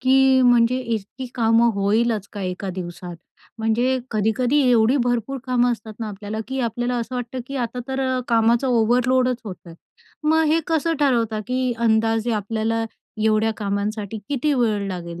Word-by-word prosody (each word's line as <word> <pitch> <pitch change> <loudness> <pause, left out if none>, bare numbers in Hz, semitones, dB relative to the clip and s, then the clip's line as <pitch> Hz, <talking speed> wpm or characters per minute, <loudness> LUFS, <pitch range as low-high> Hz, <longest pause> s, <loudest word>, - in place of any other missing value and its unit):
की 265 0 +4
म्हणजे 245 0 +4
इतकी 235 +2 -4
कामं 230 0 +3
होईलच 210 +1 +1
का 205 - -6
एका 185 +1 -4
दिवसात? 175 -1 -7 0.4
म्हणजे 240 +4 +1
कधी-कधी 230 +6 +1
एवढी 235 +3 +4
भरपूर 245 +2 -1
कामं 245 -1 +2
असतात 220 -1 -8
ना 220 - -3
आपल्याला, 205 +1 -6
की 265 0 -2
आपल्याला 240 +1 -1
असं 235 +1 -4
वाटतं, 245 +1 -4
की 275 - -5
आता 245 0 -3
तर 265 0 -2
अ, 255 0 0
कामाचा 230 +2 +3
ओव्हरलोडच 250 +2 +2
होतंय. 180 -4 -9 0.5
मग 320 +1 +3
हे 320 +2 +3
कसं 325 0 +1
ठरवता, 230 -6 +1
की 255 -1 0
अंदाजे 225 0 +2
आपल्याला 220 +2 -1 0.4
एवढ्या 220 0 +3
कामांसाठी 205 +1 -3
किती 290 +1 0
वेळ 215 -5 +1
लागेल? 170 -2 -6
230 Hz, 155 wpm, -22 LUFS, 215-255 Hz, 0.5 s, की